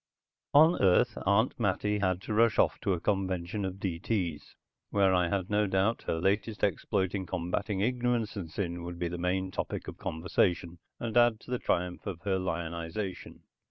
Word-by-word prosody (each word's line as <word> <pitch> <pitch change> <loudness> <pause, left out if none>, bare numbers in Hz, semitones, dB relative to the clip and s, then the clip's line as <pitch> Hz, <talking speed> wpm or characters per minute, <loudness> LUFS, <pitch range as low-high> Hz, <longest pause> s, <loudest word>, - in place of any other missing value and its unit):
On 160 +4 +6
Earth 105 +5 +4
Aunt 110 +6 +2
Mattie 105 0 +1
had 95 -1 0
to 110 - -3
rush 115 0 +4
off - - +2
to 100 - +1
a 90 - -1
convention 95 0 -1
of 95 0 -4
D.T.'s, 90 -3 -2 0.3
where 100 -2 +3
I 90 -1 +2
had 95 -1 -1
no 105 0 +3
doubt 95 +4 +1
her 80 - 0
latest 100 +4 0
exploit 95 -1 0
in 95 -3 -3
combating 95 +3 -2
ignorance 120 -1 0
and 90 -5 -5
sin 85 -1 -3
would 85 0 -6
be 85 0 -2
the 85 0 -5
main 95 +1 -1
topic - - -4
of - - -8
conversation 85 +1 0 0.2
and 115 -1 -4
add 120 -2 +5
to - - -11
the 125 - 0
triumph 90 +2 -1
of 90 -4 -5
her 95 -2 0
lionization. 85 +2 -4
95 Hz, 180 wpm, -30 LUFS, 90-105 Hz, 0.3 s, On